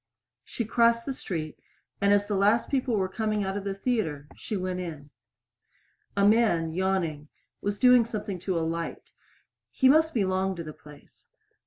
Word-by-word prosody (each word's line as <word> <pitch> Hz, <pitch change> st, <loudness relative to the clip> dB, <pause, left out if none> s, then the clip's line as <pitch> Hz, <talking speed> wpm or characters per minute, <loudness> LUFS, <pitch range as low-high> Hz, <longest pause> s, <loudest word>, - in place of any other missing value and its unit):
She 235 Hz, -, -4 dB
crossed 230 Hz, +1 st, +3 dB
the 275 Hz, -, -2 dB
street, 160 Hz, -, -5 dB, 0.4 s
and 200 Hz, 0 st, +4 dB
as 205 Hz, 0 st, +3 dB
the 205 Hz, -, -3 dB
last 205 Hz, +4 st, +2 dB
people 260 Hz, -4 st, +1 dB
were 190 Hz, -1 st, +1 dB
coming 215 Hz, +1 st, -1 dB
out 190 Hz, 0 st, -3 dB
of 205 Hz, -, -3 dB
the 200 Hz, -1 st, -3 dB
theater 195 Hz, -, -2 dB
she 210 Hz, -, -4 dB
went 185 Hz, -1 st, -3 dB
in. 155 Hz, -5 st, -7 dB, 1.1 s
A 200 Hz, 0 st, +5 dB
man, 205 Hz, -8 st, +3 dB
yawning, 175 Hz, -5 st, -1 dB, 0.3 s
was 205 Hz, 0 st, -2 dB
doing 250 Hz, 0 st, +6 dB
something 210 Hz, -4 st, -5 dB
to 185 Hz, 0 st, -2 dB
a 165 Hz, -, 0 dB
light. 165 Hz, 0 st, -5 dB, 0.6 s
He 265 Hz, -, +2 dB
must 320 Hz, +2 st, +4 dB
belong 190 Hz, -2 st, 0 dB
to 170 Hz, -, -6 dB
the 155 Hz, -1 st, -8 dB
place. 150 Hz, -1 st, -17 dB
195 Hz, 170 wpm, -27 LUFS, 170-225 Hz, 1.1 s, doing